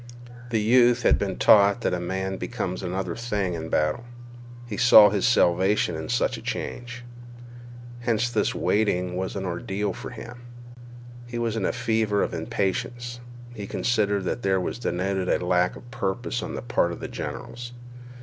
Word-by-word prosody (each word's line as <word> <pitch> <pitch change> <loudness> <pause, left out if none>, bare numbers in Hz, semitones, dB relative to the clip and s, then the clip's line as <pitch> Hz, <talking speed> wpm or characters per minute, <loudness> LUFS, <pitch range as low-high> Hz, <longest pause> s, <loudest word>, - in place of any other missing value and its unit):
The 115 -2 +1
youth 120 +2 +4
had - - +4
been 95 -2 -2
taught 100 +2 +5
that - - 0
a 90 - -1
man 95 +2 -3
became 90 - -3
another 95 +1 -3
thing 105 -6 -2
in 80 -1 -5
battle. 75 +9 0 0.6
He 115 -3 -5
saw 110 -2 +8
his 100 -2 +1
salvation 95 -4 +3
in 80 0 -6
such 125 0 +1
a - - -9
change. 120 0 -5 1.0
Hence 120 -1 +1
this 120 - 0
waiting 90 -4 +1
was 95 +2 -3
an 95 -1 -3
ordeal 95 +3 -2
to - - -8
him. 120 0 -9 0.9
He 120 0 -5
was 115 -1 -1
in 105 -4 -1
a - - +1
fever 110 -2 +1
of - - -3
impatience. 120 +5 -3 0.3
He 105 -4 -7
considered 105 -4 0
that 115 +6 -2
there 95 -3 +2
was 95 +6 -3
denoted 95 -2 -1
a 90 - +1
lack 90 0 +2
of 120 - -13
purpose 120 +5 -2
on - - -5
the - - -5
part 120 -8 +1
of - - -7
the - - -5
generals. 120 0 -6
105 Hz, 170 wpm, -25 LUFS, 95-120 Hz, 1.0 s, saw